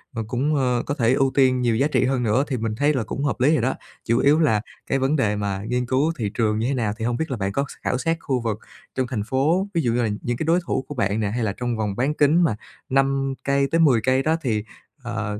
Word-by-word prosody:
rồi 115 - -2
cũng, 135 +7 0
ơ, 125 -3 +1
có 145 - -2
thể 120 -3 +2
ưu 135 -1 +2
tiên 130 -2 +3
nhiều 120 -2 +2
giá 135 +6 +2
trị 140 - +1
hơn 130 -1 0
nữa, 115 +5 +2
thì 130 - -2
mình 110 -1 -2
thấy 145 +5 +2
là 130 -4 0
cũng 140 - -4
hợp 145 - -1
lý 145 +5 +4
rồi 145 - +2
đó. 130 +3 0 0.3
Chủ 115 0 +2
yếu 145 +3 +4
là 110 -10 +3 0.3
cái 135 - +1
vấn 135 +3 +1
đề 105 -7 +1
mà 100 -2 -2
nghiên 125 0 0
cứu 135 +6 +1
thị 105 -4 -2
trường 110 -1 0
như 115 - 0
thế 140 - 0
nào 110 -5 -1
thì 115 - -3
hông 120 0 0
biết 160 0 -3
là 125 - -2
bạn 95 -1 -2
có 140 +7 -1
s - - -8
khảo 125 - 0
sát 165 +5 0
khu 130 -6 -1
vực 110 -3 -2 0.4
trong 130 -1 0
thành 115 -5 -3
phố, 150 - +1
ví 170 - +1
dụ 120 - +1
như 120 - +1
là 110 - 0
những 120 0 -2
cái - - -2
đối 170 +3 +3
thủ 130 - -1
của 145 - -7
bạn 100 -3 0
nè 105 -2 0
hay 120 0 -2
là 100 -2 -1
trong 120 -2 -2
vòng 105 -3 -2
bán 135 +7 0
kính 155 +4 +3
mà 150 - +2 0.3
5 135 0 +1
cây 140 0 +2
tới 165 - +2
10 135 -9 +4
cây 130 +3 +2
đó 160 +2 +2
thì, 110 -7 -1 0.4
ờ, 110 -3 -4
130 Hz, 290 wpm, -23 LUFS, 115-140 Hz, 0.4 s, lý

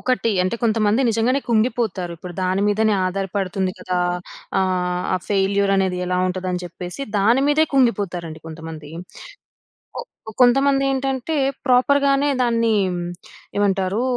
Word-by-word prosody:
ఒకటి 250 -3 0
అంటే, 185 +5 -1
కొంతమంది 225 +2 +2
నిజంగానే 230 +5 +1
కుంగిపోతారు. 220 -6 0
ఇప్పుడు 180 +1 -9
దాని 185 +1 0
మీదనే 215 +1 +2
ఆధారపడుతుంది 190 0 -2
కదా! 180 0 -2 0.6
ఆహ్, 180 -1 0
ఆ - - +2
ఫెయిల్యూర్ 200 0 +2
అనేది 190 -2 0
ఎలా 180 0 0
ఉంటది 185 0 -3
అని 180 0 -3
చెప్పేసి, 175 - -8 0.2
దాని 230 +7 +3
మీదే 310 +2 +4
కుంగిపోతారండి 185 -10 0
కొంతమంది. 160 -2 -9 1.1
కొ - - -3 0.4
కొంతమంది 275 +2 +4
ఏంటంటే 270 +3 -1 0.3
ప్రోపర్‌ 255 +2 +4
గానే 275 +1 +2
దాన్ని 230 -2 +2 0.8
ఏమంటారు? 195 +1 +1
200 Hz, 125 wpm, -21 LUFS, 185-245 Hz, 1.1 s, మీదే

